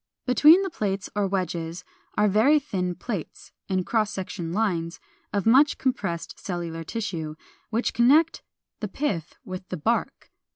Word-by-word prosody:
Between 305 +8 +7
the 385 - -3
plates 195 - -2
or 205 -1 +1
wedges 175 -3 -3 0.3
are 210 - +4
very 220 +10 +5
thin 185 -11 -2
plates 200 -8 -6 0.2
(in 185 -1 +1
cross 215 +1 +1
section 185 -4 -5
lines) 175 -5 -1 0.3
of 200 -1 -1
much 270 +6 +5
compressed 195 -10 -2
cellular 170 -3 -4
tissue, 165 -6 -4 0.3
which 230 +2 0
connect 295 +7 +4 0.4
the 210 - -3
pith 190 - -3
with 185 0 -7
the 180 - -3
bark. 225 +10 -1
200 Hz, 140 wpm, -25 LUFS, 175-235 Hz, 0.4 s, Between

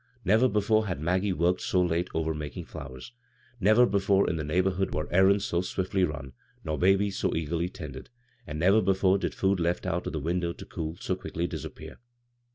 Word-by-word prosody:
Never 110 +7 +4
before 110 +1 +2
had 90 -6 -3
Maggie 90 +5 0
worked 90 0 +1
so 90 - +1
late 85 0 +1
over 80 0 0
making 75 -3 -6
flowers; 65 - -9 0.5
never 110 +5 +5
before 100 -2 +2
in 85 - 0
the 80 - -3
neighborhood 95 +5 0
were 75 - -2
errands 95 +2 +4
so 85 - 0
swiftly 95 +1 -1
run, 75 -5 -3 0.3
nor 75 -1 -3
babies 95 +2 +2
so 95 - 0
eagerly 85 +2 -1
tended 75 -8 -9 0.2
— 120 -1 -33
and 75 - -5
never 95 +7 +4
be 95 -1 +2
fore 95 0 +3
did - - -3
food 95 -1 +1
left 85 +1 0
out 85 +2 -2
the 80 - -3
window 85 +3 -1
to - - -11
cool, 80 0 -5
so 95 - -1
quickly 85 -2 -4
disappear. 80 -5 -7
90 Hz, 195 wpm, -28 LUFS, 80-95 Hz, 0.5 s, never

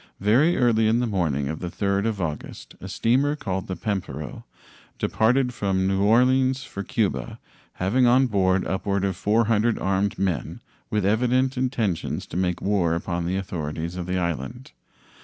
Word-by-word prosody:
Very 125 - +3
early 115 -3 +3
in 115 +2 +3
the 125 - +1
morning 80 - 0
of 80 +2 -4
the 90 - -4
3d 100 +3 0
of 110 -3 -2
August 80 -5 -5
a - - -7
steamer 135 +6 +1
called 95 -9 -4
the 95 - -3
Pampero 100 +1 -4 0.5
departed 125 +3 +1
from 95 -4 0
New 95 0 +1
Orleans 130 +5 +3
for 100 - -7
Cuba, 85 - -2 0.4
having 120 +8 +2
on 130 +2 +5
board 95 -5 +1
upward 100 0 -1
of 95 -2 -1
400 110 +3 +2
armed 95 +1 0
men 90 -8 -2 0.3
with 105 -3 0
evident 125 +5 +2
intentions 120 -9 -1
to - - -10
make 90 -1 -1
war 95 -5 +1
upon 85 0 -3
the 95 +2 -1
authorities 85 -2 -4
of 90 -1 -5
the 90 0 -1
island. 85 - -4
100 Hz, 160 wpm, -24 LUFS, 90-120 Hz, 0.5 s, on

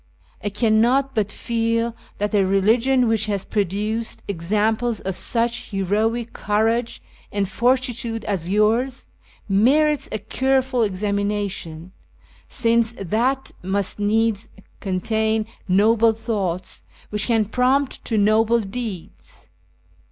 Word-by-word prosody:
I 205 - 0
cannot 235 +6 +2
but 210 -2 0
feel 230 0 -1 0.2
that 205 +1 -2
a 200 -2 +4
religion 230 +7 +3
which 220 -1 +1
has 200 -2 -1
produced 210 +3 -2
examples 215 +5 0
of 190 -1 -4
such 235 +3 -1
heroic 215 +4 -1
courage 225 +3 0 0.3
and 200 -1 0
fortitude 240 0 0
as 180 -4 -2
yours, 225 +6 +1 0.4
merits 280 +9 +3
a - - -1
careful 260 +4 0
examination, 200 -4 -2 0.6
since 230 -2 +1
that 240 +8 -1
must 195 +2 -2
needs 220 +1 +1 0.3
contain 220 +3 0 0.2
noble 220 +4 +4
thoughts 200 -6 -3 0.3
which 210 -1 0
can 225 -3 +2
prompt 255 +5 +1
to 225 - 0
noble 220 +3 +3
deeds. 210 -3 -7
220 Hz, 105 wpm, -22 LUFS, 200-235 Hz, 0.6 s, a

